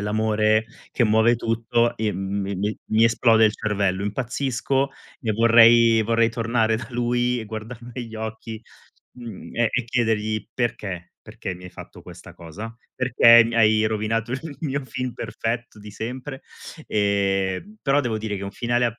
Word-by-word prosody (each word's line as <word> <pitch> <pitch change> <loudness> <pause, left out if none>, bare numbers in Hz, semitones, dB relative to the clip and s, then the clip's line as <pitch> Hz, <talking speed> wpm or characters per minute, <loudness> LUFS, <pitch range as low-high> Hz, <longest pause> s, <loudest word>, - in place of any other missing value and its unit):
l'amore 110 +1 +1 0.3
che 120 - +2
muove 110 +2 +3
tutto." 115 +1 0
Ehm, 105 -3 -1
mi 95 +1 -3
mi 105 +3 -2
mi 110 +1 +3
esplode 115 -1 +4
il 105 - +3
cervello, 100 -3 -1
impazzisco 130 +4 -1 0.3
e 115 -4 -2
vorrei 115 0 +6
vorrei 115 +1 +2
tornare 115 -1 0
da 110 0 -7
lui 120 0 0
e 115 - -5
guardarlo 115 +3 -8
negli 120 -2 -7
occhi, 110 0 -6 0.5
mhmm, 120 -5 -10
e 120 -1 +2
e 125 - -1
chiedergli: 110 -3 -1
"Perché? 105 -7 -3
Perché 95 - -7
mi 90 0 -13
hai 90 - -9
fatto - - -12
questa - - -12
cosa? 105 +8 -9 0.2
Perché 120 -2 +6
mi 115 +1 -3
hai 110 -1 +4
rovinato 110 +2 -1
il 145 +3 -6
mio 140 -3 -2
film 130 -1 -4
perfetto 115 -1 -4
di 105 0 -11
sempre?" 130 +6 -6 0.5
Ehm, 100 - 0
però 140 +1 +3
devo 120 -5 -2
dire 110 -1 -4
che - - -7
un 100 - -5
finale 120 +3 0
a 115 0 -5
115 Hz, 160 wpm, -23 LUFS, 105-120 Hz, 0.5 s, vorrei